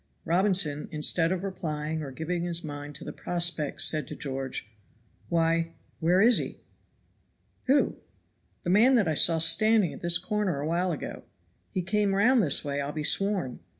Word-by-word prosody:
Robinson, 175 -4 +1
instead 165 +2 +1
of 185 0 -2
replying 155 -5 -4
or 145 - -6
giving 160 +6 -4
his 170 0 -1
mind 145 -1 -7
to - - -9
the - - -7
prospect 170 -4 -1
said 155 -1 +1
to - - -7
George, 135 -4 -5 0.6
"Why, 165 0 +1 0.3
where 175 +4 +3
is 240 +1 +6
he?" - - -6 1.0
"Who?" 280 +2 +2 0.7
"The 175 - -1
man 235 +7 +5
that 215 -7 +2
I 160 - +1
saw 165 +2 +3
standing 205 +4 +3
at - - -11
this 170 0 +3
corner 190 -4 -2
a 145 - -3
while 175 +3 0
ago. 155 - -6 0.4
He 185 - -3
came 200 +1 0
round 240 +5 +4
this 155 -4 +2
way 140 0 -2
I'll 140 +1 -4
be 150 0 -4
sworn." 195 -7 +1
170 Hz, 170 wpm, -27 LUFS, 150-195 Hz, 1.0 s, is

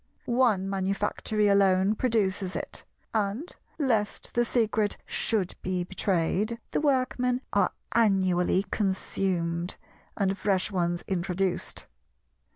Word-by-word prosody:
One 235 -6 +2
manufactory 200 +2 0
alone 195 0 +4
produces 205 -5 0
it; - - -5 0.3
and, 215 - -1 0.2
lest 230 -9 0
the 240 - +3
secret 220 -3 +1
should 205 -5 0
be 185 -1 -1
betrayed, 190 +4 0
the - - 0
Workmen 255 -3 +1
are 200 - +3 0.2
annually 190 -4 +3
consumed, 180 -3 -1 0.4
and 195 -1 +1
fresh 195 0 0
ones 175 -2 0
introduced. 185 0 -1
195 Hz, 100 wpm, -28 LUFS, 185-220 Hz, 0.4 s, alone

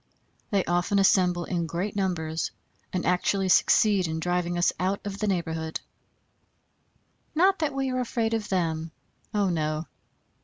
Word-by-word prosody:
They 200 -2 +1
often 175 +4 +1
assemble 180 -3 +3
in 170 -2 -2
great 180 +5 -3
numbers 170 -5 -1 0.4
and 180 - -2
actually 185 +1 +1
succeed 200 -1 +4
in 160 0 -3
driving 175 +1 -1
us 175 - +3
out 190 +3 0
of 200 0 -5
the 215 - 0
neighborhood. 160 -4 -2 1.6
Not 375 +3 +4
that 305 -3 -1
we 270 -1 -1
are 255 - -1
afraid 230 -2 -1
of 220 -2 -2
them, 165 -3 -1 0.4
oh 205 -3 +1
no! 155 -1 -1
185 Hz, 145 wpm, -27 LUFS, 170-205 Hz, 1.6 s, succeed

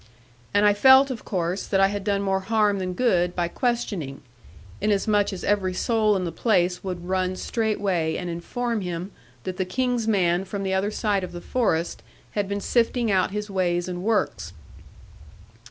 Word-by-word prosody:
And 205 +1 +3
I 205 - +6
felt, 265 +5 +6
of 235 - -6
course, 180 0 -2
that 195 - +1
I 195 0 +5
had 205 -1 -4
done 200 0 0
more 195 -1 +1
harm 210 0 +1
than 185 -1 -3
good 180 -7 +2
by 175 -1 0
questioning; 195 - -2 0.6
inasmuch 205 0 +2
as 190 - -6
every 190 -3 +1
soul 215 -1 +2
in 190 - -1
the 170 - -3
place 180 -1 +1
would 180 -2 -5
run 185 0 0
straightway 195 -7 -1
and 180 - -4
inform 225 +7 -3
him 180 +1 -4 0.3
that 185 -1 -5
the 190 - +1
King's 245 +3 -1
man 180 -4 +2
from 195 +1 -5
the 190 0 -1
other 190 +2 +1
side 210 -3 0
of 180 - -6
the 175 - -6
forest 175 -6 -1 0.3
had 205 -2 -2
been 200 0 -2
sifting 235 0 +1
out 190 -1 +2
his 210 +1 -4
ways 175 -2 0
and 180 -1 -4
works.' 140 - -1
195 Hz, 180 wpm, -24 LUFS, 180-215 Hz, 0.6 s, I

